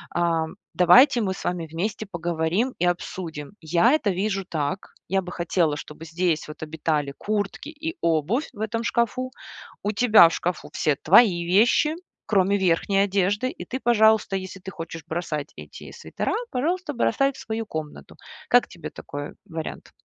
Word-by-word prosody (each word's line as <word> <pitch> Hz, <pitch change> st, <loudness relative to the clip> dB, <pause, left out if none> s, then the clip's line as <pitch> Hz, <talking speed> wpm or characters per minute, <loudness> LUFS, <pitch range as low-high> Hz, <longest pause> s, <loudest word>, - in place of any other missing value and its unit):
а: 170 Hz, -2 st, +1 dB, 0.3 s
давайте 245 Hz, +9 st, +6 dB
мы 190 Hz, -2 st, 0 dB
с -, -, -9 dB
вами 175 Hz, -2 st, -2 dB
вместе 200 Hz, +7 st, -3 dB
поговорим 175 Hz, +7 st, -1 dB
и 175 Hz, -, +2 dB
обсудим. 170 Hz, -4 st, -3 dB
Я 170 Hz, +9 st, +3 dB
это 250 Hz, -10 st, +2 dB
вижу 195 Hz, +1 st, -1 dB
так. 160 Hz, +3 st, -3 dB, 0.2 s
Я 195 Hz, 0 st, +2 dB
бы 180 Hz, -, -8 dB
хотела, 170 Hz, -3 st, 0 dB
чтобы 150 Hz, +2 st, -9 dB
здесь 165 Hz, -1 st, -1 dB
вот 150 Hz, -, -10 dB
обитали 150 Hz, -2 st, -2 dB
куртки 210 Hz, +6 st, -3 dB
и 320 Hz, +3 st, -6 dB
обувь 170 Hz, -, +1 dB
в 205 Hz, -, -14 dB
этом 225 Hz, +1 st, -2 dB
шкафу. 245 Hz, +2 st, 0 dB, 0.5 s
У 205 Hz, -, 0 dB
тебя 215 Hz, -5 st, +7 dB
в -, -, -6 dB
шкафу 175 Hz, -1 st, -3 dB
все 150 Hz, -, +1 dB
твои 175 Hz, -, +5 dB
вещи, 230 Hz, -, +3 dB, 0.3 s
кроме 200 Hz, -1 st, +3 dB
верхней 190 Hz, +2 st, +1 dB
одежды, 200 Hz, +5 st, +1 dB
и -, -, -8 dB
ты, 260 Hz, -, -4 dB
пожалуйста, 220 Hz, -4 st, +3 dB
если 190 Hz, 0 st, -5 dB
ты 190 Hz, -, -8 dB
хочешь 165 Hz, -1 st, -7 dB
бросать 160 Hz, -3 st, -3 dB
эти -, -, -11 dB
свитера, -, -, -3 dB, 0.2 s
пожалуйста, 320 Hz, +5 st, -1 dB
бросай 275 Hz, +2 st, +1 dB
в -, -, -15 dB
свою 225 Hz, 0 st, -4 dB
комнату. 155 Hz, -6 st, -7 dB, 0.3 s
Как -, -, +5 dB
тебе -, -, -8 dB
такой 145 Hz, 0 st, -7 dB, 0.2 s
вариант? 160 Hz, -1 st, -6 dB
185 Hz, 160 wpm, -24 LUFS, 165-220 Hz, 0.5 s, тебя